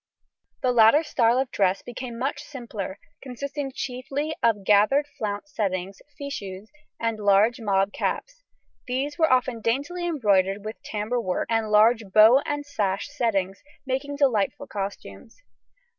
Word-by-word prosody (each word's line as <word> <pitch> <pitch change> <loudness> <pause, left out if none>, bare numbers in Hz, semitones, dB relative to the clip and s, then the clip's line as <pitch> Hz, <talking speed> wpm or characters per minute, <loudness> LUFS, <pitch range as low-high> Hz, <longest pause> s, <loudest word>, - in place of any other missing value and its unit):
The 255 - +3
later 240 +6 +6
style 240 -5 +2
of 265 -1 -1
dress 190 -1 +1
became 240 -1 -7
much 275 +4 -2
simpler, 235 -10 -7 0.2
consisting 275 +2 -5
chiefly 275 +4 -4
of 220 -4 +2
gathered 210 +9 +4
flounce 210 +7 -4
settings, 190 -2 -3 0.2
fichus, 210 -8 -7 0.3
and 230 -1 -1
large 210 +4 +3
mob 195 -1 +1
caps; - - -3 0.5
these 275 +4 -2
were 320 -3 +4
often 255 -2 +1
daintily 285 +10 -1
embroidered 200 - +1
with 215 - -7
tambour 220 +3 -2
work 185 -5 -2
and 225 -1 +1
large 220 +2 +5
bow 220 +6 +7
and 290 0 -2
sash 205 -6 -2
settings, 200 -8 -1 0.2
making 270 +2 -2
delightful 275 -1 +1
costumes. 200 - -7
230 Hz, 135 wpm, -25 LUFS, 205-275 Hz, 0.5 s, bow